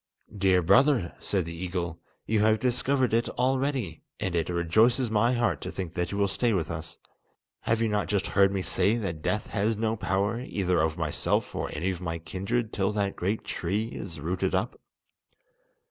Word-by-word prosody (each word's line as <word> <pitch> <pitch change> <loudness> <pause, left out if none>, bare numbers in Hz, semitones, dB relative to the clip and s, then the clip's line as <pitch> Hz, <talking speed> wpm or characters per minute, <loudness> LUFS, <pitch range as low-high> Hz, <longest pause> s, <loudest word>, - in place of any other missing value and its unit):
"Dear 95 -2 +3
brother," 120 - +4
said 95 -4 0
the 85 - -6
eagle, 85 -1 -4 0.3
"you 110 -1 +1
have 110 +1 +4
discovered 130 0 +1
it 115 +1 +2
already, 130 - -1 0.2
and 95 - -2
it 85 -1 0
rejoices 110 +9 +3
my 115 +3 +3
heart 120 -1 0
to - - -4
think 90 -3 -5
that 90 -1 -2
you 100 - -3
will 100 -1 +3
stay 115 +4 +1
with 85 -4 -1
us. 80 -1 -6 0.6
Have 115 0 0
you - - +2
not 105 -2 0
just 100 -1 0
heard 100 0 +3
me 95 -1 -1
say 105 +4 +2
that 90 -8 -4
death 105 +6 -1
has 105 +1 +1
no 110 0 0
power 100 +1 0
either 90 -8 0
over 80 +1 -1
myself 80 -3 0
or - - -3
any 95 +2 -1
of 90 -1 -6
my 85 -2 -3
kindred 95 +8 -3
till 95 0 +1
that 100 -1 -1
great 100 +5 -1
tree 105 +6 -2
is 85 -8 -7
rooted 85 +5 -1
up? - - -2
100 Hz, 190 wpm, -27 LUFS, 90-115 Hz, 0.6 s, brother